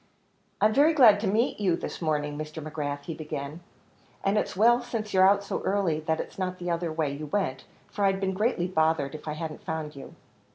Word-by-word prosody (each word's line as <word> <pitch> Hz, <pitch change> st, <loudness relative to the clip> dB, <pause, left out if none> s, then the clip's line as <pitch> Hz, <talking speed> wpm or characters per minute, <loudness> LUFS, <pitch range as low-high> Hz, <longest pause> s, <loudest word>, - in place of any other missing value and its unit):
"I'm 215 Hz, 0 st, +4 dB
very 300 Hz, +6 st, +4 dB
glad 225 Hz, -8 st, +7 dB
to 210 Hz, -, -1 dB
meet 220 Hz, +5 st, +1 dB
you 185 Hz, -5 st, +2 dB
this -, -, -6 dB
morning, 150 Hz, -2 st, -1 dB
Mr. 155 Hz, +1 st, -6 dB
McGrath," 145 Hz, -2 st, -4 dB
he 165 Hz, -, -5 dB
began, 150 Hz, -1 st, -6 dB, 0.6 s
"and 195 Hz, +1 st, +2 dB
it's 210 Hz, -, 0 dB
well 240 Hz, +5 st, +5 dB
since 230 Hz, -3 st, -4 dB
you're 190 Hz, 0 st, +6 dB
out 200 Hz, 0 st, +2 dB
so 200 Hz, -, -3 dB
early, 190 Hz, -6 st, 0 dB
that 160 Hz, +1 st, -1 dB
it's -, -, -6 dB
not 185 Hz, -1 st, -2 dB
the 175 Hz, -1 st, -3 dB
other 170 Hz, -1 st, -1 dB
way 155 Hz, -3 st, -1 dB
you 150 Hz, +1 st, -6 dB
went, 145 Hz, -6 st, -2 dB, 0.3 s
for 205 Hz, -, 0 dB
I'd 195 Hz, 0 st, +2 dB
been 190 Hz, -1 st, -1 dB
greatly 210 Hz, -2 st, 0 dB
bothered 160 Hz, -5 st, +1 dB
if 155 Hz, 0 st, -9 dB
I 150 Hz, -, -2 dB
hadn't 155 Hz, 0 st, -6 dB
found 155 Hz, -2 st, -4 dB
you." 140 Hz, +4 st, -10 dB
170 Hz, 215 wpm, -27 LUFS, 155-200 Hz, 0.6 s, glad